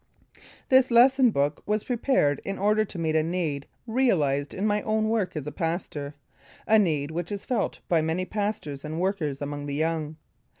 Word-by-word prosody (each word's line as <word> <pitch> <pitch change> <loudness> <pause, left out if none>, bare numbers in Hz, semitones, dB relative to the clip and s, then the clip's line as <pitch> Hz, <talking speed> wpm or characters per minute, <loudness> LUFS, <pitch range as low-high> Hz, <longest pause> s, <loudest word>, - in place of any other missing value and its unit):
This 260 -1 +5
lesson 255 +2 +6
book 145 -6 0
was 210 0 0
prepared 240 - +1
in 195 - -4
order 210 +2 +2
to 200 - -8
meet 160 -2 -1
a 160 - +4
need 160 -4 -2 0.2
realized 165 - +1
in 195 - -3
my 210 0 +1
own 215 0 0
work 220 -6 0
as 150 -3 -4
a 150 - -4
pastor; 160 -4 -4 0.5
a 220 0 +5
need 155 -6 0
which 170 +2 -4
is 200 -1 -5
felt 250 - -1
by 170 -5 +3
many 160 +4 -1
pastors 200 -10 -3
and 155 +2 -4
workers 165 -7 -1
among 145 0 -5
the 140 - -3
young. 160 0 -1
175 Hz, 180 wpm, -26 LUFS, 150-215 Hz, 0.5 s, lesson